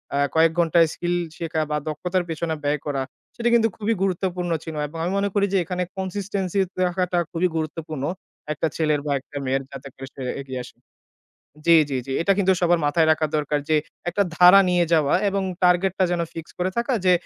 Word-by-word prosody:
আ -, -, +1 dB, 0.2 s
কয়েক 160 Hz, 0 st, +5 dB
ঘন্টায় 165 Hz, 0 st, +4 dB
স্কিল 175 Hz, 0 st, -2 dB, 0.2 s
শেখা 160 Hz, -1 st, -2 dB
বা 150 Hz, -, +1 dB
দক্ষতার 180 Hz, +4 st, -1 dB
পেছনে 160 Hz, 0 st, -2 dB
ব্যয় 145 Hz, 0 st, 0 dB
করা 140 Hz, -2 st, -1 dB, 0.3 s
সেটা 240 Hz, 0 st, 0 dB
কিন্তু 225 Hz, -1 st, +5 dB
খুবই 220 Hz, +1 st, 0 dB
গুরুত্বপূর্ণ 180 Hz, -2 st, -1 dB
ছিল 160 Hz, -, -7 dB
এবং 165 Hz, -, -10 dB
আমি 175 Hz, -, -1 dB
মনে 200 Hz, 0 st, +1 dB
করি 200 Hz, -1 st, +3 dB
যে -, -, +4 dB
এখানে 180 Hz, +1 st, -2 dB
consistency 190 Hz, 0 st, -2 dB, 0.3 s
রাখাটা 180 Hz, 0 st, -1 dB
খুবই 175 Hz, +2 st, +1 dB
গুরুত্বপূর্ণ 155 Hz, -2 st, -4 dB, 0.5 s
একটা 160 Hz, -, -1 dB
ছেলের 155 Hz, -2 st, +1 dB
বা 145 Hz, -, -1 dB
একটা 145 Hz, -, -10 dB
মেয়ের 135 Hz, +1 st, 0 dB
যাতে 135 Hz, 0 st, -9 dB
করে 135 Hz, 0 st, -8 dB
সে 135 Hz, -, -10 dB, 0.2 s
এগিয়ে 130 Hz, -2 st, -5 dB
আসে 125 Hz, -, -14 dB, 0.9 s
জি, 170 Hz, -1 st, +7 dB
জি, 135 Hz, -, -1 dB
জি। 135 Hz, -, -4 dB
এটা 195 Hz, +3 st, +3 dB
কিন্তু 190 Hz, -1 st, +4 dB
সবার 175 Hz, -1 st, +3 dB
মাথায় 160 Hz, +2 st, +3 dB
রাখা 155 Hz, 0 st, 0 dB
দরকার 150 Hz, 0 st, 0 dB
যে 155 Hz, -, +3 dB, 0.3 s
একটা 200 Hz, +3 st, +1 dB
ধারা 180 Hz, +2 st, +8 dB
নিয়ে 175 Hz, -1 st, +3 dB
যাওয়া 150 Hz, -3 st, +3 dB
এবং 195 Hz, 0 st, -1 dB, 0.2 s
টার্গেটটা 185 Hz, +1 st, +3 dB
যেন 175 Hz, -1 st, 0 dB
ফিক্স 165 Hz, -1 st, -8 dB
করে 180 Hz, +1 st, 0 dB
থাকা 235 Hz, +3 st, 0 dB
যে 180 Hz, -, +5 dB
170 Hz, 195 wpm, -23 LUFS, 155-185 Hz, 0.9 s, ধারা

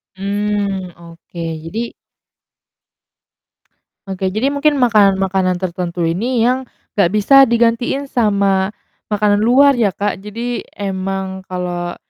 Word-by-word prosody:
Mmm, 200 Hz, -2 st, -2 dB
oke, 170 Hz, 0 st, -10 dB, 0.2 s
jadi 225 Hz, +7 st, -4 dB, 2.1 s
Oke 190 Hz, 0 st, -2 dB
jadi 250 Hz, +9 st, -1 dB
mungkin 290 Hz, 0 st, +2 dB
makanan-makanan 195 Hz, -6 st, +2 dB
tertentu 175 Hz, -1 st, -3 dB
ini 225 Hz, +8 st, 0 dB
yang 255 Hz, 0 st, 0 dB, 0.3 s
nggak 195 Hz, -4 st, +3 dB
bisa 210 Hz, +7 st, +3 dB
digantiin 235 Hz, +4 st, +1 dB
sama 200 Hz, -6 st, +1 dB, 0.4 s
makanan 205 Hz, 0 st, +2 dB
luar 270 Hz, +5 st, +5 dB
ya, 230 Hz, -5 st, +2 dB
Kak, 205 Hz, -1 st, -2 dB
jadi 230 Hz, +4 st, -4 dB
emang 190 Hz, -1 st, -3 dB
kalau 175 Hz, -1 st, -4 dB
200 Hz, 105 wpm, -17 LUFS, 190-235 Hz, 2.1 s, luar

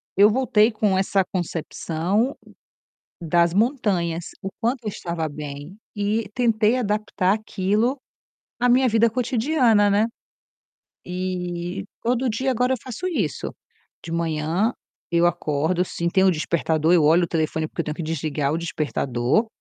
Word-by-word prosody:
eu 205 Hz, +2 st, +7 dB
voltei 235 Hz, -2 st, +3 dB
com 210 Hz, -3 st, +1 dB
essa 195 Hz, 0 st, +2 dB
concepção 175 Hz, -, -1 dB, 0.9 s
das 170 Hz, +1 st, +2 dB
montanhas. 195 Hz, -, 0 dB, 0.2 s
O 195 Hz, -, -4 dB
quanto 245 Hz, +2 st, 0 dB
eu -, -, 0 dB
estava 170 Hz, -4 st, -3 dB
bem 145 Hz, +3 st, -8 dB, 0.2 s
e 210 Hz, +1 st, -1 dB
tentei 230 Hz, -1 st, +2 dB
adaptar 210 Hz, -4 st, 0 dB
aquilo 215 Hz, +4 st, 0 dB, 0.6 s
à 245 Hz, -, +3 dB
minha 255 Hz, +2 st, +5 dB
vida 225 Hz, +1 st, +4 dB
cotidiana, 240 Hz, -2 st, +2 dB
né, 205 Hz, +2 st, +3 dB, 1.0 s
e 180 Hz, 0 st, -4 dB, 0.2 s
todo 250 Hz, +2 st, +1 dB
dia 260 Hz, +4 st, 0 dB
agora 250 Hz, +1 st, +1 dB
eu -, -, -3 dB
faço 255 Hz, +8 st, -5 dB
isso. 210 Hz, -, -2 dB, 0.5 s
De 165 Hz, -, -6 dB
manhã 165 Hz, +6 st, 0 dB, 0.4 s
eu 170 Hz, 0 st, +3 dB
acordo, 160 Hz, +1 st, 0 dB
assim, 170 Hz, -1 st, -2 dB
tenho 190 Hz, +2 st, +3 dB
o -, -, +6 dB
despertador, 160 Hz, 0 st, +1 dB
eu 175 Hz, -3 st, +5 dB
olho 165 Hz, +4 st, +5 dB
o -, -, -2 dB
telefone 160 Hz, -1 st, -1 dB
porque -, -, -5 dB
eu -, -, -1 dB
tenho 150 Hz, -, -3 dB
que 170 Hz, -, -5 dB
desligar 155 Hz, -2 st, -1 dB
o 160 Hz, -, 0 dB
despertador. 145 Hz, -, 0 dB
190 Hz, 145 wpm, -23 LUFS, 165-225 Hz, 1.0 s, eu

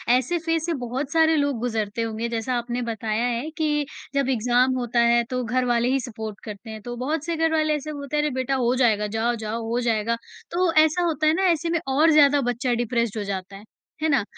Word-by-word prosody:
ऐसे 260 Hz, +8 st, 0 dB
फेज़ 330 Hz, -1 st, -1 dB
से 340 Hz, -, -1 dB
बहुत 265 Hz, +4 st, -3 dB
सारे 320 Hz, -1 st, +4 dB
लोग 285 Hz, -4 st, +1 dB
गुजरते 225 Hz, -2 st, -2 dB
होंगे। 225 Hz, +1 st, -2 dB
जैसा 235 Hz, +2 st, -2 dB
आपने 240 Hz, +1 st, -3 dB
बताया 220 Hz, +1 st, -1 dB
है 245 Hz, +6 st, -2 dB
कि 295 Hz, -2 st, +1 dB, 0.3 s
जब 275 Hz, -1 st, +1 dB
एग्ज़ाम 250 Hz, +1 st, +2 dB
होता 240 Hz, 0 st, 0 dB
है 235 Hz, 0 st, +4 dB
तो 250 Hz, -1 st, -2 dB
घर 250 Hz, +2 st, 0 dB
वाले 240 Hz, 0 st, +2 dB
ही 270 Hz, -, +2 dB
सपोर्ट 220 Hz, -4 st, -7 dB
करते 215 Hz, +1 st, -8 dB
हैं। 220 Hz, -1 st, -7 dB
तो 240 Hz, +2 st, -6 dB
बहुत 300 Hz, +4 st, -2 dB
से 335 Hz, -1 st, -1 dB
घर 325 Hz, 0 st, +1 dB
वाले 310 Hz, -1 st, +2 dB
ऐसे 300 Hz, +1 st, -5 dB
बोलते 285 Hz, +1 st, -4 dB
हैं, 295 Hz, -, +2 dB
अरे 300 Hz, -, 0 dB
बेटा 260 Hz, +1 st, 0 dB
हो 250 Hz, -1 st, +1 dB
जाएगा, 215 Hz, -5 st, +2 dB
जाओ-जाओ, 225 Hz, 0 st, -2 dB
हो 240 Hz, +1 st, 0 dB
जाएगा। 230 Hz, 0 st, 0 dB, 0.3 s
तो 350 Hz, -1 st, +2 dB
ऐसा 315 Hz, +3 st, 0 dB
होता 310 Hz, -2 st, +1 dB
है 310 Hz, -, +5 dB
ना 380 Hz, +3 st, 0 dB
ऐसे 335 Hz, +1 st, -1 dB
में 335 Hz, -1 st, +1 dB
और 305 Hz, +5 st, +4 dB
ज़्यादा 290 Hz, -1 st, +5 dB
बच्चा 245 Hz, +1 st, -1 dB
डिप्रेस्ड 235 Hz, -2 st, -1 dB
हो 210 Hz, -, -2 dB
जाता 195 Hz, 0 st, -5 dB
है। 200 Hz, -, -11 dB, 0.4 s
है 315 Hz, -, +2 dB
ना? 270 Hz, -7 st, +3 dB
250 Hz, 230 wpm, -24 LUFS, 230-300 Hz, 0.4 s, है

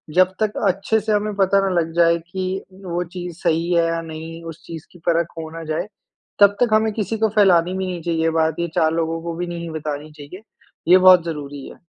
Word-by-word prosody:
जब 185 Hz, 0 st, +4 dB
तक 215 Hz, -1 st, 0 dB
अच्छे 195 Hz, +4 st, +1 dB
से 215 Hz, +1 st, -3 dB
हमें 210 Hz, 0 st, 0 dB
पता 195 Hz, 0 st, +3 dB
ना -, -, +1 dB
लग 165 Hz, -, -4 dB
जाए 170 Hz, 0 st, +4 dB
कि 190 Hz, 0 st, -3 dB, 0.2 s
वो 175 Hz, 0 st, -2 dB
चीज़ 175 Hz, -2 st, -6 dB
सही 170 Hz, 0 st, +1 dB
है 170 Hz, -1 st, +3 dB
या 165 Hz, 0 st, -1 dB
नहीं, 165 Hz, +1 st, -8 dB
उस 165 Hz, 0 st, -9 dB
चीज़ 165 Hz, -2 st, -9 dB
की 175 Hz, -, -17 dB
परख 170 Hz, -1 st, +2 dB
हो 160 Hz, -1 st, -6 dB
ना 165 Hz, -, -6 dB
जाए, 160 Hz, +5 st, -2 dB, 0.5 s
तब 200 Hz, 0 st, +6 dB
तक 240 Hz, -3 st, +3 dB
हमें 220 Hz, 0 st, +3 dB
किसी 220 Hz, +1 st, -2 dB
को 220 Hz, 0 st, +2 dB
फ़ैलानी 180 Hz, -4 st, +4 dB
भी 190 Hz, -, -2 dB
नहीं 180 Hz, -2 st, -4 dB
चाहिए 165 Hz, -1 st, 0 dB
बात 160 Hz, 0 st, 0 dB
ये 170 Hz, -, 0 dB
4 160 Hz, 0 st, +3 dB
लोगों 165 Hz, 0 st, -1 dB
को 170 Hz, 0 st, -4 dB
भी 175 Hz, +1 st, -4 dB
नहीं 170 Hz, -1 st, -5 dB
बतानी 150 Hz, -1 st, -5 dB
चाहिए। 150 Hz, +6 st, -11 dB, 0.5 s
ये 185 Hz, -, +9 dB
बहुत 185 Hz, -2 st, +7 dB
ज़रूरी 145 Hz, -4 st, -6 dB
है। -, -, -13 dB
170 Hz, 225 wpm, -21 LUFS, 165-190 Hz, 0.5 s, ये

